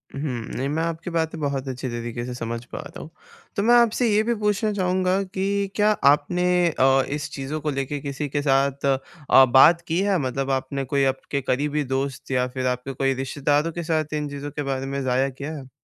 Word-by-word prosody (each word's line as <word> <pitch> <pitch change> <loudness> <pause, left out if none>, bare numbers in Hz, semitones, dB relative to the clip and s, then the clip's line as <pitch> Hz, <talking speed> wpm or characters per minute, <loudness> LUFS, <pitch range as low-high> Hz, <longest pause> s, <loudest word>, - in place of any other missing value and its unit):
हुँ। 140 - -4
नहीं, 130 -2 -3
मैं 160 +3 -1
आपकी 165 +1 -3
बातें 165 -1 -1
बहुत 140 -2 -2
अच्छे 130 0 -4
तरीक़े 120 0 -4
से 125 - -5
समझ 115 -1 -4
पा - - -8
रहा 145 - -9
हूँ। - - -9 0.5
तो 200 - 0
मैं 240 +2 +5
आपसे 235 +1 +2
ये 210 0 +3
भी 235 +1 0
पूछना 210 0 0
चाहूँगा 185 0 +1
कि 195 +1 -1
क्या 210 0 +4 0.2
आपने 175 +5 0 0.2
अ, 135 -3 +3
इस 145 +1 -4
चीज़ों 140 +3 -4
को 150 - -2
लेके 135 +1 -3
किसी 140 +1 -4
के 145 +1 -1
साथ 140 0 +1
अ, 135 0 +3
बात 135 +7 +6
की 165 +2 0
है, 200 -1 +2
मतलब 135 -1 -2
आपने 135 +1 -2
कोई 140 +2 +1
आपके 140 +1 -4
करीबी 145 +3 0
दोस्त 135 -1 -3
या 125 -1 +1
फिर 130 0 -3
आपके 125 +2 -2
कोई 135 0 +1
रिश्तेदारों 145 +4 0
के 170 +1 -5
साथ 155 -2 -1
इन 150 -1 -2
चीज़ों 145 +1 -6
के 145 - -4
बारे 135 -1 -2
में 140 0 -3
ज़ाहिर 130 +1 +1
किया 140 +4 -6
है? 135 -2 -10
140 Hz, 210 wpm, -23 LUFS, 135-165 Hz, 0.5 s, बात